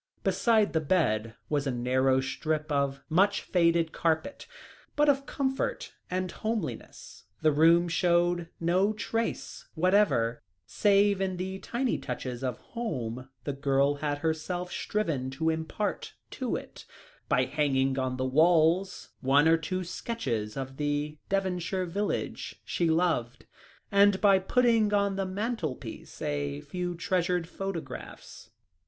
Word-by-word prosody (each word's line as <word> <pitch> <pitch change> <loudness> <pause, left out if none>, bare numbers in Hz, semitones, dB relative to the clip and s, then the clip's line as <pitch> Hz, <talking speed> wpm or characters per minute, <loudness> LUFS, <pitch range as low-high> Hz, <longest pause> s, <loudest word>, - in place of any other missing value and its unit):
Beside 220 -3 +2
the 160 - +2
bed 115 - +1
was 145 -2 0
a - - +1
narrow 130 +2 +2
strip 155 +3 -2
of 140 -1 0
much 195 +5 +3
faded 170 -2 +2
carpet, 160 - -1 0.5
but 295 0 +3
of 275 -1 +2
comfort 275 - -2 0.2
and 185 0 -2
homeliness 220 0 -5 0.2
the 155 - +5
room 165 +4 +5
showed 175 0 +2
no 185 +5 +2
trace 225 +1 -3
whatever, 175 - +2 0.2
save 200 - +3
in 190 -1 -1
the 190 +1 -4
tiny 245 +4 -1
touches 125 0 -5
of 125 -2 -2 0.2
home 130 - -4
the 145 - -2
girl 140 +1 +1
had 145 0 -1
herself 165 +3 -2
striven 155 -12 -2
to 160 +5 0
impart 160 +6 -3 0.2
to - - -2
it, - - -8 0.4
by - - +3
hanging 135 -2 +1
on 130 -1 -1
the 130 - -1
walls 165 +6 +3
one 140 +3 +4
or 165 - +6
two 185 +3 -3
sketches 135 - -3
of 135 0 -5
the 150 0 -2
Devonshire 185 -1 -1
village 200 +4 -3
she 170 -2 0
loved, 160 -8 0 0.5
and 200 -1 +5
by 195 -2 +5
putting 225 +1 +3
on 200 -1 +1
the 195 -1 -1
mantelpiece 190 - -4
a 70 -1 -2
few 180 - -4
treasured 175 0 0
photographs. 195 -2 -7
170 Hz, 130 wpm, -29 LUFS, 140-195 Hz, 0.5 s, or